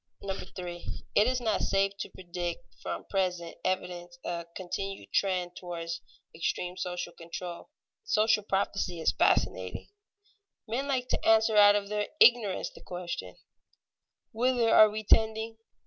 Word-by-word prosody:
[Sidenote: 195 -1 -4
Unripe - - -8
social 180 - -11
philosophy] 175 -2 -6
3. - - +5
It 215 - +4
is 255 0 0
not 220 -4 +1
safe 195 0 +2
to - - -4
predict 175 +3 -6
from - - -4
present 180 -3 -1
evidence 175 -2 -3
a 170 -1 -3
continued 195 +2 -5
trend 180 -2 +1
toward 170 -2 -5 0.4
extreme 175 +2 -2
social 180 -1 -4
control. 170 +3 -7 0.3
Social 220 - +3
prophecy 195 -3 -1
is 160 - +3
fascinating. 95 0 +1 0.8
Men 250 +6 -2
like 260 -3 0
to - - -1
answer 220 0 +4
out 205 0 +8
of 200 -1 -1
their 210 0 -1
ignorance 230 -6 +5
the - - -15
question, 175 - -6 1.0
Whither 240 0 +2
are 215 - +9
we 215 +1 -4
tending? 220 +1 +2
195 Hz, 145 wpm, -29 LUFS, 175-220 Hz, 1.0 s, are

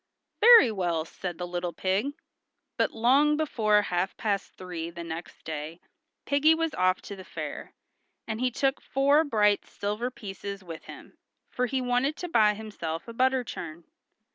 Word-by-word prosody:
"Very 460 - +8
well," 175 -5 -1
said 175 0 -6
the 180 - -4
little 175 0 -3
pig. 195 - -1 0.6
But - - +2
long 275 +6 +3
before 215 -9 +2
half 180 0 -2
past 205 -3 -2
three 175 -3 -6
the 170 0 -8
next 165 +1 -8
day, 155 +2 -6 0.5
piggy 295 +3 +4
was 325 0 -1
off 185 0 +1
to 200 - -7
the 190 - -10
fair, - - -7 0.5
and 220 -1 -3
he 255 - +2
took 270 +2 0
four 280 +3 +3
bright 210 -8 +2
silver 210 +4 -3
pieces 200 -4 -7
with 165 -3 -9
him, - - -12 0.3
for 250 0 0
he 265 +1 -1
wanted 250 +4 +1
to 355 - -4
buy 215 -9 +4
himself 195 -6 -6
a 230 - -7
butter 260 +1 +2
churn. 170 -7 -7
210 Hz, 165 wpm, -27 LUFS, 180-260 Hz, 0.6 s, Very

